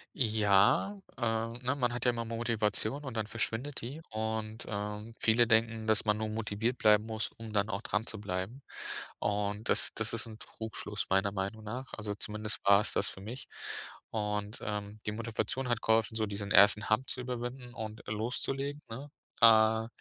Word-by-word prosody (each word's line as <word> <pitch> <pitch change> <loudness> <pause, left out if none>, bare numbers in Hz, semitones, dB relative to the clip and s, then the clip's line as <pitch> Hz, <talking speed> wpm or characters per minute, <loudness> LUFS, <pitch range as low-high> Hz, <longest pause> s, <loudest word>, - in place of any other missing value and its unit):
Ja, 110 - +3 0.2
äh, - - -11
ne, 115 +3 0
man 125 -4 +1
hat 120 +1 -3
ja 125 - +5
immer 115 -1 -3
Motivation 115 +2 0
und 130 -4 -6
dann 110 - 0
verschwindet 115 +5 -3
die. 135 +7 -6
Und, 110 0 -3
äh, 105 +2 -4
viele 115 +1 +4
denken, 115 -1 +2
dass 110 0 +3
man 105 0 +3
nur 110 0 -2
motiviert 110 +2 -1
bleiben 105 +1 +4
muss, 110 -1 -2
um 115 -1 -8
dann 105 0 +2
auch 100 0 -3
dran 105 +1 -1
zu 110 -2 -6
bleiben. 95 +7 -4 0.6
Und 105 +1 -1
das - - +5
das 110 -1 +1
ist 115 0 +2
'n 110 -1 -9
Trugschluss 110 -2 -4
meiner 95 +1 +3
Meinung 100 +2 -3
nach. 125 +5 -6
Also, 105 -1 -3
zumindest 105 +1 -2
war 100 0 +7
es - - 0
das - - +1
für 95 - -9
mich. 120 +6 -7 0.6
Und, 105 -1 -2
ähm, 105 0 -4
die - - +1
Motivation 115 +3 -2
hat 120 -1 +1
geholfen, 110 0 +2
so 110 -1 0
diesen 100 0 -5
1. 100 +1 +7
Hump 130 +5 +2
zu - - -1
überwinden 125 0 -5
und 110 -1 -6
loszulegen, 135 +7 -2
ne? 135 +6 -7 0.3
Äh, 110 0 +6
110 Hz, 180 wpm, -32 LUFS, 105-120 Hz, 0.6 s, war